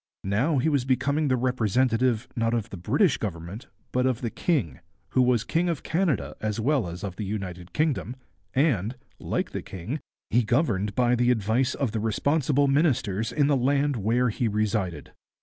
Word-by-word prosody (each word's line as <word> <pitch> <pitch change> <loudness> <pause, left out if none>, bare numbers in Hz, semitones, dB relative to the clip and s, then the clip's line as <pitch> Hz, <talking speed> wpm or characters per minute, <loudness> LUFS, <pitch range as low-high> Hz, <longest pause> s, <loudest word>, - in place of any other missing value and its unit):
Now 120 +11 +1
he 135 - +1
was 145 -5 +2
becoming 140 +4 +1
the 130 - +3
representative, 125 -1 +1
not 115 0 +1
of 115 -3 -3
the - - -5
British 130 - +2
Government, 100 - -5 0.2
but 125 +1 +2
of 130 -1 -1
the 115 -3 -2
king, 110 - -1 0.3
who 130 - +2
was 125 -3 +3
king 170 +6 0
of 165 -5 -2
Canada 165 - 0
as 110 0 -2
well 130 -3 +1
as 85 +3 -7
of 95 -2 -5
the - - -3
United 95 -4 -5
Kingdom, 150 -5 -1 0.4
and, 125 - +2 0.2
like - - -2
the - - -4
king, 100 - -5 0.3
he 120 - +4
governed 105 - 0
by 125 -1 +3
the 120 0 +2
advice 120 +4 +1
of 135 -6 -1
the 110 - -2
responsible 140 +6 +1
ministers 130 - +1
in 145 -1 +2
the 145 0 +3
land 140 +2 +2
where 120 +3 +1
he 115 +2 -1
resided. 105 -7 -1
120 Hz, 180 wpm, -26 LUFS, 105-140 Hz, 0.4 s, he